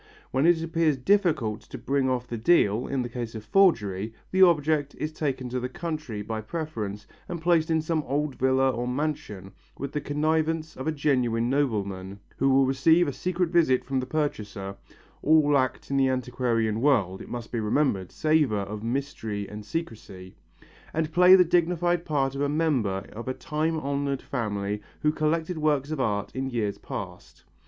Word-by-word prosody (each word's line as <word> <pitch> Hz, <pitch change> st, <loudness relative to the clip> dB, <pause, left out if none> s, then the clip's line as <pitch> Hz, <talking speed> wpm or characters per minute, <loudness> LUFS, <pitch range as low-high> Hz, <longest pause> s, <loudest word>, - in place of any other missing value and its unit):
When 135 Hz, +5 st, +2 dB
it 170 Hz, -2 st, +4 dB
appears 165 Hz, -3 st, +1 dB
difficult 150 Hz, -, +1 dB
to -, -, -10 dB
bring 135 Hz, -1 st, 0 dB
off 125 Hz, -1 st, -1 dB
the 120 Hz, -, -5 dB
deal, 115 Hz, -3 st, +3 dB
in 135 Hz, -2 st, -1 dB
the -, -, -3 dB
case 120 Hz, -1 st, -6 dB
of 110 Hz, -1 st, -7 dB
forgery, 110 Hz, -, +2 dB, 0.2 s
the 190 Hz, -, +2 dB
object 155 Hz, -4 st, +3 dB
is 155 Hz, -, -3 dB
taken 135 Hz, -5 st, -2 dB
to 125 Hz, +1 st, -2 dB
the 125 Hz, +1 st, -3 dB
country 150 Hz, -8 st, -5 dB
by 110 Hz, +1 st, -4 dB
preference 110 Hz, -7 st, -5 dB, 0.2 s
and 175 Hz, -, -4 dB
placed 165 Hz, -1 st, +2 dB
in 160 Hz, -1 st, +1 dB
some 160 Hz, -1 st, 0 dB
old 145 Hz, +2 st, -1 dB
villa 130 Hz, +1 st, +2 dB
or 120 Hz, 0 st, -3 dB
mansion 125 Hz, -8 st, -3 dB, 0.3 s
with 140 Hz, 0 st, -5 dB
the 150 Hz, -, -2 dB
connivance 155 Hz, +2 st, 0 dB
of 130 Hz, -, -6 dB
a -, -, +2 dB
genuine 125 Hz, -5 st, +1 dB
nobleman, 100 Hz, -8 st, -1 dB, 0.2 s
who 135 Hz, -, +2 dB
will 135 Hz, 0 st, +5 dB
receive 160 Hz, +6 st, +4 dB
a 140 Hz, -, -2 dB
secret 180 Hz, +1 st, -1 dB
visit 155 Hz, -8 st, +3 dB
from 135 Hz, -1 st, -1 dB
the 130 Hz, -, -4 dB
purchaser 105 Hz, -10 st, -3 dB, 0.5 s
all 150 Hz, -1 st, +4 dB
acts 130 Hz, 0 st, 0 dB
in 140 Hz, -, +1 dB
the 135 Hz, -1 st, +3 dB
antiquarian 120 Hz, -3 st, 0 dB
world, 110 Hz, -10 st, +2 dB
it -, -, -10 dB
must 120 Hz, -2 st, -6 dB
be 120 Hz, -, -1 dB
remembered, 105 Hz, -4 st, 0 dB
savour 150 Hz, -9 st, +2 dB
of 105 Hz, +1 st, -6 dB
mystery 115 Hz, -5 st, -3 dB
and 105 Hz, 0 st, -8 dB
secrecy 105 Hz, -, -6 dB, 0.6 s
and 160 Hz, 0 st, -1 dB
play 180 Hz, +2 st, +8 dB
the 180 Hz, -1 st, +6 dB
dignified 175 Hz, 0 st, +1 dB
part 135 Hz, -4 st, 0 dB
of 140 Hz, -, -4 dB
a 145 Hz, -, +1 dB
member 135 Hz, -11 st, 0 dB
of 115 Hz, +3 st, -8 dB
a 130 Hz, -, -2 dB
time 155 Hz, +1 st, -1 dB
honoured 140 Hz, -1 st, -2 dB
family 105 Hz, -4 st, -3 dB, 0.2 s
who 150 Hz, -, +3 dB
collected 160 Hz, +2 st, -1 dB
works 150 Hz, -2 st, +1 dB
of 155 Hz, -, -3 dB
art 105 Hz, -5 st, -1 dB
in 130 Hz, 0 st, -2 dB
years 110 Hz, -5 st, -2 dB
past. -, -, -8 dB
135 Hz, 180 wpm, -26 LUFS, 115-155 Hz, 0.6 s, play